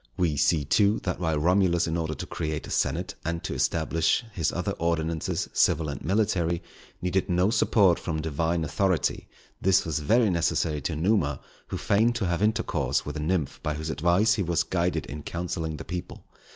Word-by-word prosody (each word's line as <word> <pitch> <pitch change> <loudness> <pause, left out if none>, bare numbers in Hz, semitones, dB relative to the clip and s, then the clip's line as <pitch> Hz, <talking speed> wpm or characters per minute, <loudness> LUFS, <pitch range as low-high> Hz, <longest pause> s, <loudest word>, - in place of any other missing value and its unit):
We 85 -5 +1
see, 75 +1 +2
too, 100 +8 +3
that 90 - -2
while 80 -3 0
Romulus 90 +1 +3
in 80 - -2
order 80 -2 -2
to - - -6
create 75 -1 -4
a - - -9
senate, - - 0
and 85 +1 -3
to - - -3
establish 80 +7 +1
his 85 -7 -1
other - - -2
ordinances 85 -1 -1
civil 80 -2 +2
and 70 - -6
military, 90 -5 0 0.4
needed 90 +1 0
no 90 +3 +2
support 100 -7 +3
from 80 -2 -3
Divine 80 +2 -1
authority, 90 +2 0 0.3
this 95 +1 +3
was 80 -3 -1
very 110 +8 +3
necessary 80 -3 0
to 80 +4 -2
Numa, 80 -4 +1 0.3
who - - -4
feigned 115 +4 +2
to 110 -4 -1
have 85 +1 -1
intercourse 110 +2 0
with 75 - -5
a - - -3
Nymph 80 -1 -1
by 75 -1 -2
whose 80 +1 -4
advice 85 +8 +3
he 105 - -1
was 85 -1 +1
guided 90 0 -1
in 75 +1 -7
counselling 85 -1 -4
the - - -8
people. 90 -1 -6
85 Hz, 185 wpm, -26 LUFS, 80-95 Hz, 0.4 s, too